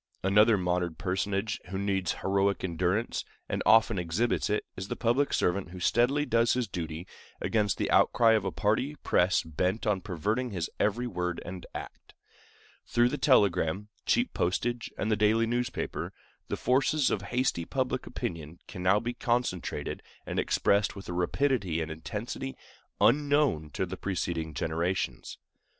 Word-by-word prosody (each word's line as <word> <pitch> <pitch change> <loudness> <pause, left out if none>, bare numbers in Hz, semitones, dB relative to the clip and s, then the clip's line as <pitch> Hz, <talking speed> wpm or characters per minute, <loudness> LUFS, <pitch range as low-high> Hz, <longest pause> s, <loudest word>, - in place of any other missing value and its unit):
Another 105 +3 +5
modern 90 -2 -1
personage 95 +4 -2
who 95 - -3
needs 95 -2 0
heroic 100 0 +1
endurance, 90 +5 0 0.2
and - - -2
often 110 -2 +5
exhibits 90 +10 0
it, 105 - 0
is 95 +1 -5
the - - -3
public 125 +5 +1
servant 90 +1 0
who 90 +1 -9
steadily 125 +10 +2
does 115 -3 +3
his 125 -2 0
duty 85 -2 -5 0.3
against 105 -3 +1
the - - -1
outcry 115 -1 +5
of 110 -3 +3
a 95 - -2
party 110 +11 0
press 90 +2 +3
bent 90 +8 -1
on 105 -3 +1
perverting 105 +7 -1
his 90 -6 -3
every 110 +4 +1
word 90 -6 -2
and 90 0 -7
act. - - -9 0.7
Through 120 +1 +3
the 150 - -3
telegram, 100 - +3 0.2
cheap 245 +1 +2
postage, 115 +7 -1
and 110 - -1
the - - +4
daily 110 +2 +3
newspaper, 120 +1 -2 0.3
the - - -3
forces 135 +3 +2
of 100 - 0
hasty 120 -4 0
public - - -2
opinion 80 0 -5
can 90 - -8
now 95 +3 +4
be 120 +2 -3
concentrated 120 -8 -2 0.2
and - - -2
expressed 100 0 +2
with 100 -2 -9
a - - -3
rapidity 95 - 0
and 80 0 -3
intensity 115 +10 -5 0.4
unknown 145 - +3
to 95 - -1
preceding 85 -4 -3
generations. 85 +5 -2
100 Hz, 150 wpm, -29 LUFS, 90-120 Hz, 0.7 s, Another